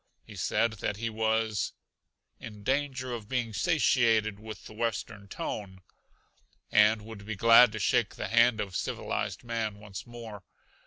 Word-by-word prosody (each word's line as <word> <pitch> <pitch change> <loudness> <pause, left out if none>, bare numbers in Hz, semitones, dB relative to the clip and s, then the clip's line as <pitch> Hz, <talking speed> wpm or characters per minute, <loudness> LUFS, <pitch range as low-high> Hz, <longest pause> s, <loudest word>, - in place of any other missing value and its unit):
He 110 - -13
said 110 +4 +1
that 105 - -2
he 115 +1 -3
was 110 -1 0 0.7
"in 105 -2 -10
danger 130 -1 -1
of 110 -3 -7
being 120 -4 -1
satiated 115 - +2
with 110 0 -9
the - - -10
Western 110 -2 -3
tone" 95 -1 -6 0.9
and 105 +1 +5
would 110 -2 -10
be 110 +1 -5
glad 115 +2 +7
to - - -4
shake 115 +1 +1
the - - -4
hand 115 0 +4
of 100 -3 -4
civilized - - -3
man 115 -3 -3
once 100 -1 -9
more. 115 -4 -9
110 Hz, 150 wpm, -29 LUFS, 105-115 Hz, 0.9 s, glad